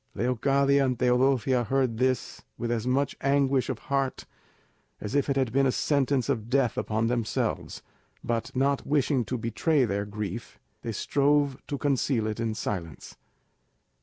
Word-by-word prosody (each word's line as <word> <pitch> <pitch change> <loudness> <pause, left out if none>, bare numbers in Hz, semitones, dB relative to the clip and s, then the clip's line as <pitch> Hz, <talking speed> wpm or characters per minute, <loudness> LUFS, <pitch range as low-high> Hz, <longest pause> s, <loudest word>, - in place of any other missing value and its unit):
Leocadia 135 +4 +2
and 130 -2 0
Teodosia 125 0 +2
heard 130 -3 0
this 130 -1 0 0.2
with 120 0 -2
as 120 0 -1
much 135 +2 +1
anguish 140 -1 +2
of 130 - -2
heart 135 +1 -2 0.7
as 105 - -5
if 140 0 +1
it 140 - +1
had 130 -4 +1
been 135 +2 +3
a - - +2
sentence 140 -2 +1
of 110 0 -2
death 130 -2 +2
upon 110 +1 -1
themselves; 115 -2 -2 0.4
but 115 -1 -2
not 140 +1 +1
wishing 140 -3 +2
to 125 +3 -3
betray 125 +5 +1
their 100 -1 -2
grief, 105 -2 -6 0.2
they 115 - -4
strove 140 +3 +1
to 140 - -3
conceal 135 -5 0
it 110 0 -3
in 115 -1 -1
silence. 85 -8 -5
130 Hz, 155 wpm, -27 LUFS, 115-140 Hz, 0.7 s, been